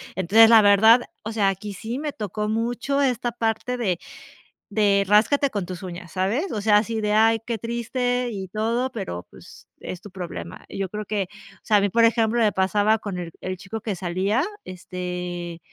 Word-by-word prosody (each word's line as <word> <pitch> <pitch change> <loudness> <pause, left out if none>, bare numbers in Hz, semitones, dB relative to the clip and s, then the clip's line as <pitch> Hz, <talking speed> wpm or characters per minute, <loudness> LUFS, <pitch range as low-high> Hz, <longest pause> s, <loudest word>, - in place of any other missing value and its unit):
Entonces, 215 +5 +6
la 225 -2 +8
verdad, 220 +4 +6 0.2
o 220 +1 -5
sea, 200 -3 +2
aquí 200 +2 -5
sí 230 +6 -5
me 300 -1 -3
tocó 210 0 -4
mucho 240 +5 -1
esta 245 -3 0
parte 230 +2 -1
de 190 -8 -1 0.7
de 200 -2 +3
ráscate 270 +7 +4
con 200 -6 -3
tus 185 0 -7
uñas, 175 -2 -8
¿sabes? 215 - -1
O 210 -3 -3
sea, 210 0 +5
así 220 +1 -1
de, 210 0 0
ay, 225 +1 +4
qué 230 -1 -3
triste, 245 +2 -2
y 190 -3 -6
todo, 230 +5 -1
pero, 90 - -5
pues, - - -15
es 180 - -7
tu 205 - -12
problema. 180 -2 -7
Y - - -9
yo 195 -2 -2
creo 210 +1 -5
que, 205 -1 -1 0.3
o - - -26
sea, 210 -2 +3
a - - +3
mí, 200 - +1
por 230 +4 +3
ejemplo, 230 0 +2
me 215 -2 +4
pasaba 205 +3 +2
con 200 -4 -5
el 170 -2 -5
el 185 0 -4
chico 215 +4 -7
que 210 -4 -3
salía, 190 - 0 0.2
este 180 -1 -6
210 Hz, 200 wpm, -23 LUFS, 190-230 Hz, 0.7 s, la